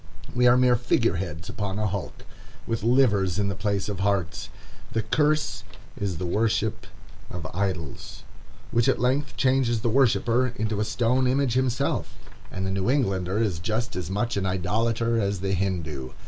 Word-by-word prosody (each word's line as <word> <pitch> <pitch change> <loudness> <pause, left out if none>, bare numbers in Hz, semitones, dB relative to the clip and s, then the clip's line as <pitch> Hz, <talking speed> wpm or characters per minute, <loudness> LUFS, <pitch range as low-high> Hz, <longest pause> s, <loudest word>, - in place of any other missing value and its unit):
We 125 0 +4
are 125 +1 +6
mere 125 -1 +5
figure 115 -5 +1
heads 85 -2 -5
upon 100 -2 -3
a 105 - 0
hulk, 100 -3 -4 0.4
with 115 -1 -2
livers 105 -6 +3
in 100 -1 +1
the 100 - -3
place 100 -1 -1
of 100 -3 -4
hearts. 100 -3 -1 0.4
The 110 - 0
curse 150 +6 +1 0.3
is 95 -4 -3
the 90 - -3
worship 110 +3 0 0.4
of 90 -3 -6
idols, 90 -6 -4 0.5
which 120 -1 +3
at - - +2
length 130 +5 0
changes 130 -4 +2
the 115 - 0
worshipper 125 -1 +3
into 110 -3 -2
a 105 - +1
stone 125 +3 +1
image 130 -1 +1
himself; 130 +1 0 0.3
and 95 - -4
the 95 - -1
New 95 +3 0
Englander 95 -8 +1
is 105 -7 0
just 110 +7 -2
as 90 -2 -4
much 105 +4 -1
an 100 - 0
idolater 115 +5 0
as 100 -2 -1
the 95 0 -1
Hindoo. 80 -8 -2
105 Hz, 170 wpm, -25 LUFS, 95-120 Hz, 0.5 s, are